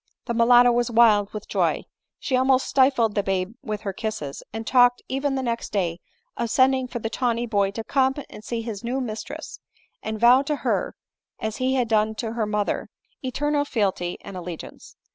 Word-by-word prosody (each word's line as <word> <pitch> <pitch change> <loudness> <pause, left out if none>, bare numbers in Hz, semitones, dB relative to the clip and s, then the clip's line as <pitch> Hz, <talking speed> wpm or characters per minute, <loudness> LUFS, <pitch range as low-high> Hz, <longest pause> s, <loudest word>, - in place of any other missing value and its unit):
The 235 - -2
mulatto 245 +1 +6
was 240 0 +1
wild 220 -3 +4
with 210 -1 -7
joy; - - 0 0.3
she 260 - -1
almost 260 0 +3
stifled 260 -5 +3
the 205 - +1
babe 195 +1 -2
with 215 -1 -4
her 195 - -4
kisses, 215 -10 -5
and 225 +1 -5
talked 245 0 +4
even 270 +1 -1
the 265 - -2
next 235 -1 -3
day 175 -4 -1 0.4
of 235 - -2
sending 260 +1 +3
for 245 - -5
the 225 - -3
tawny 240 -1 0
boy 200 -4 +1
to 220 +3 -5
come 265 +2 +2
and 210 - -12
see 230 0 -3
his 220 -3 -6
new 250 +3 -1
mis 225 -4 -4
tress, - - -8 0.4
and 220 0 -4
vow 245 +3 +7
to 295 +2 -1
her - - 0 0.4
as 220 0 -3
he 260 +1 +1
had 250 -3 +1
done 220 0 +2
to 225 0 -4
her 225 -2 -1
mother, 210 -1 -1 0.4
eternal 290 +3 0
fealty 195 -9 -1
and 195 - -9
allegiance. 175 -2 -8
230 Hz, 195 wpm, -24 LUFS, 210-255 Hz, 0.4 s, vow